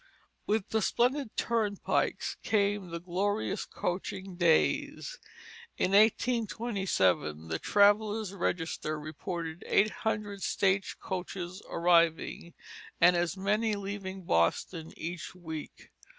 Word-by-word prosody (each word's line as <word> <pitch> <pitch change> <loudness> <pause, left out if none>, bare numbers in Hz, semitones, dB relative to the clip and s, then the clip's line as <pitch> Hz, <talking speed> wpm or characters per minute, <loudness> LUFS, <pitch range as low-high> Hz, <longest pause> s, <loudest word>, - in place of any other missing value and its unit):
With 215 -1 0
the 220 - +1
splendid 250 +3 +1
turnpikes 215 -4 0
came 205 -3 +1
the 170 0 -4
glorious 195 +4 -1
coaching 185 +1 -4
days. 175 - +1 0.6
In 185 - +1
1827 195 - +2
the 80 - -1
Traveller's 205 0 +3
Register 165 -4 -2
reported 160 +2 -5
eight 210 +2 +4
hundred 210 -2 -3
stage 195 0 +1
coaches 185 0 -5
arriving, 170 0 +2 0.4
and 175 +1 +6
as 175 +2 0
many 210 +3 +1
leaving 195 -1 -5
Boston 155 - 0
each 175 +2 -6
week. 160 -4 -8
190 Hz, 100 wpm, -30 LUFS, 170-210 Hz, 0.6 s, and